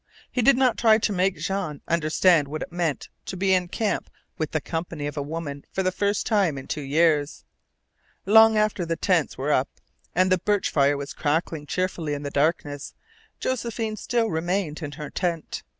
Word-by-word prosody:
He 250 - 0
did 260 +2 +5
not 255 -2 +2
try 220 -2 +6
to 210 -1 0
make 185 -1 +1
Jean 160 -3 -3
understand 165 -1 +3
what 155 +2 -4
it - - -10
meant 170 -4 -2 0.2
to 190 - -5
be 190 +1 +2
in 180 -1 +2
camp 210 +4 -2 0.3
with 155 -1 -2
the 155 - -1
company 160 0 -4
of 145 - -4
a 145 - -2
woman 145 -1 -5
for 190 - -1
the 185 - +1
first 200 +2 0
time 195 -10 +2
in 135 - -7
two 150 - -3
years. 150 +1 +1 0.8
Long 220 +2 +7
after 215 -3 +1
the 165 0 -1
tents 170 -3 +1
were 140 +3 -1
up 130 - +1 0.5
and 185 +1 +3
the 185 - +4
birch 205 +2 0
fire 140 0 +3
was 140 0 -6
crackling 155 0 -1
cheerfully 175 -4 -2
in 145 - -6
the 145 - -4
darkness 145 -1 -1 0.4
Josephine 230 -3 -2
still 235 +1 0
remained 175 0 -1
in 145 -2 -5
her 150 +1 -7
tent. 170 -4 -2
170 Hz, 190 wpm, -25 LUFS, 150-195 Hz, 0.8 s, Long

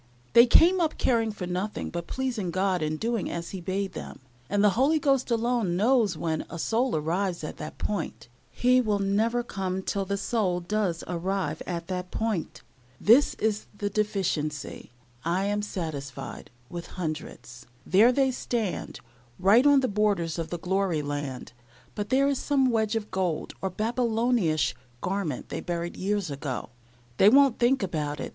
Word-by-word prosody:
They 235 +1 +8
came 350 +8 +6
up 320 -2 0
caring 225 -3 +2
for 200 -3 -6
nothing 185 +4 -3
but 170 0 -5
pleasing 250 -8 -2
God 185 0 0
and 155 0 -2
doing 230 -2 -1
as 170 0 -5
He 190 - -6
bade 190 +1 -2
them; - - -7 0.3
and 205 +1 +2
the 210 - +6
Holy 275 +9 +3
Ghost 275 -4 +1
alone 235 -6 +1
knows 220 -4 +3
when 160 -1 -1
a 170 - -6
soul 235 +7 0
arrives 170 +3 -1
at 155 - -6
that 155 - -7
point. 205 -10 -3 0.2
He 255 +1 +3
will 215 -4 +1
never 215 +5 +1
come 190 -4 -3
till 195 0 -1
the 200 +1 -2
soul 195 -4 0
does 180 -1 -1
arrive 185 +2 -2
at 170 -2 -3
that 180 0 -4
point. 220 -6 -3 0.4
This 245 +7 +5
is 215 -1 -1
the 205 -1 -2
deficiency, 185 -8 -2 0.3
I 180 +4 0
am 205 +1 0
satisfied, 145 -9 -6 0.2
with 170 +5 -7
hundreds. 155 -6 -6 0.2
There 210 +8 +6
they 265 +1 +2
stand, 235 -5 -3 0.4
right 210 +9 +5
on 285 -1 +6
the 260 - +1
borders 200 -6 0
of 165 -1 -3
the 175 - -3
glory 180 -3 0
land, 145 -4 -5 0.4
but 205 -1 -4
there 270 +2 +3
is 280 -2 0
some 270 -3 +2
wedge 220 -1 +1
of 215 -1 -3
gold, 180 -5 -1
or 190 - -1
Babylonish 225 - +1 0.3
garment 180 -6 -3
that - - -5
they - - -4
buried 175 0 -3
years 200 -3 -1
ago. 135 -4 -4 0.5
They 200 - +7
won't 275 0 +5
think 245 -1 +3
about 150 -5 -2
it. - - -4
195 Hz, 170 wpm, -27 LUFS, 170-230 Hz, 0.5 s, They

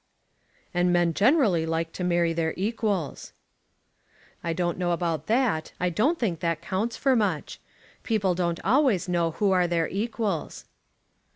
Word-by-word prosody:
"And 175 0 +2
men 175 -1 +2
generally 210 - +3
like 165 0 -2
to 180 - -5
marry 170 -1 +2
their 160 -1 -1
equals." 200 - -2 1.1
"I 170 - -1
don't 175 +1 -1
know 175 -1 +1
about 165 -3 -2
that. 225 -9 +1
I 180 0 0
don't 265 - +1
think 190 - -1
that 165 -2 -1
counts 190 +7 -2
for 270 -2 +2
much. 200 -9 -1 0.4
People 200 -5 +1
don't 170 -1 -1
always 240 - +2
know 170 -2 +1
who 195 +5 0
are 180 -2 +3
their 170 -1 0
equals." 210 -3 -3
180 Hz, 150 wpm, -26 LUFS, 170-215 Hz, 1.1 s, generally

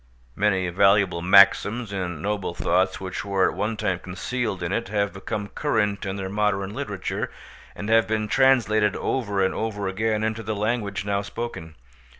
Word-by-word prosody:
Many 95 -2 +1
valuable 95 -1 +3
maxims 100 +4 +5
and 90 -5 -4
noble 100 -4 -2
thoughts 95 +2 +1
which 95 -1 -5
were 100 -2 +2
at - - -10
one 110 +1 -2
time 90 -4 -1
concealed 95 +2 -3
in 85 - -2
it 115 - -1
have 100 0 -1
become 100 +1 -5
current 105 -9 -1
in 95 - -3
their 95 -1 -4
modern 100 0 -1
literature, 105 -7 -3 0.5
and 100 - -6
have 115 0 +4
been 110 -1 -1
translated 110 -4 +3
over 100 -7 -1
and 95 - 0
over 105 -3 -3
again 110 +3 -1
into 110 0 -1
the 110 0 -3
language 105 -2 -2
now 100 0 0
spoken. 100 -6 -6
100 Hz, 165 wpm, -24 LUFS, 95-110 Hz, 0.5 s, maxims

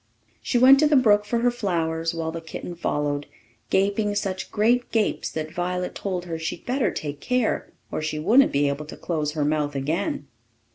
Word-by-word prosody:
She 245 - 0
went 265 +3 +8
to 305 - +5
the 300 - +3
brook 210 -5 +5
for 230 +2 0
her 245 0 +3
flowers, 165 -7 -1
while 160 -1 -2
the 165 0 -6
kitten 165 +2 -7
followed, 145 -3 -2 0.4
gaping 205 +2 +1
such 190 -2 -3
great 240 +4 +2
gapes 220 -2 0
that 155 0 -5
Violet 180 +1 -2
told 185 -3 -3
her 165 -2 -4
she'd 160 - -5
better 255 +1 +1
take 145 -1 -5
care, 250 +2 0 0.2
or - - -2
she 155 0 -2
wouldn't 225 - +4
be 140 +1 +2
able 140 +2 -3
to - - -9
close 150 -3 -2
her 150 -2 0
mouth 150 -1 0
again. 150 +4 -2
175 Hz, 190 wpm, -24 LUFS, 155-215 Hz, 0.4 s, went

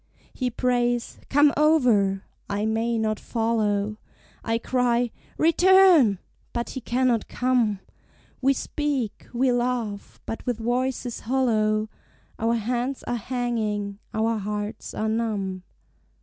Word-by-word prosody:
He 255 -2 -1
prays, 245 0 0
"Come 290 +1 +5
over" 240 -11 +3 0.3
I 205 +1 -1
may 225 +1 0
not 215 -1 0
follow; 215 -3 0 0.5
I 225 0 0
cry, 245 0 +1 0.3
"Return" 335 - +6 0.4
but 235 0 -3
he 260 - -5
cannot 245 -1 +1
come: 240 -6 +1 0.6
We 270 +1 +4
speak, 275 -5 -3
we 255 +1 +2
laugh, 240 -4 -2
but 225 - -5
with 245 -3 0
voices 245 +1 -2
hollow; 220 -4 +1 0.5
Our 230 +1 +1
hands 245 +4 -2
are - - -3
hanging, 220 -4 -2
our 220 0 0
hearts 210 +2 -5
are 220 - -1
numb. 210 -4 -1
235 Hz, 115 wpm, -25 LUFS, 215-250 Hz, 0.6 s, Return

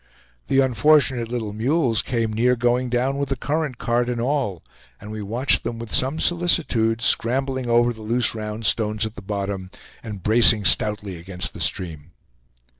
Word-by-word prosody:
The 135 - +3
unfortunate 130 -1 +2
little 115 -4 -4
mules 120 +1 +1
came 115 -3 -2
near 125 +3 +2
going 120 +1 0
down 130 +3 -1
with 140 - -2
the 135 - -1
current, 150 -2 -3
cart 120 +1 0
and 120 -1 -3
all; 120 - -2 0.4
and 105 +1 -10
we 110 0 -6
watched 115 +7 +2
them 115 - -4
with 115 -1 -8
some 135 +5 +1
solicitude 130 -11 +1
scrambling 130 +1 0
over 120 +1 +3
the 110 - -13
loose 115 +2 +2
round 110 0 -6
stones 105 +1 +1
at 110 - -6
the 110 - -10
bottom, 100 -1 -4 0.3
and 105 -5 -8
bracing 110 -1 +5
stoutly 100 +2 +1
against 90 +1 -3
the - - -8
stream. 80 -3 -3
115 Hz, 170 wpm, -22 LUFS, 105-130 Hz, 0.4 s, bracing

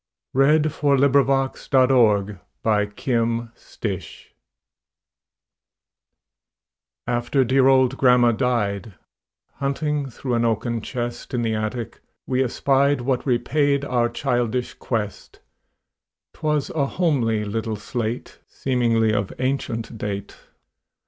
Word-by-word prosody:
Eugene 150 +4 +4
Field 140 -2 +1
Little 140 0 +5
Homer's 130 -6 +2 1.2
Slate 95 -6 -7 2.8
AFTER 120 +3 +1
dear 130 +1 +3
old 130 -1 +4
grandma 125 -2 +5
died, 110 -5 -1 0.6
Hunting 140 0 -1
through 125 +1 -4
an 120 0 +2
oaken 115 0 0
chest 120 +2 -5
In 120 - 0
the 115 -1 0
attic, 110 +2 -4 0.3
we 130 0 +1
espied 140 +2 +2
What 130 +2 -1
repaid 140 +3 +1
our 120 -3 +1
childish 120 +1 -1
quest; 105 -4 -4 0.9
'Twas 150 -2 -1
a 140 -3 0
homely 120 -11 0
little 110 +1 -3
slate, 115 +3 -4
Seemingly 115 -4 +1
of 100 -2 -1
ancient 120 -4 -3
date. 100 -1 -4
125 Hz, 95 wpm, -22 LUFS, 115-135 Hz, 2.8 s, Little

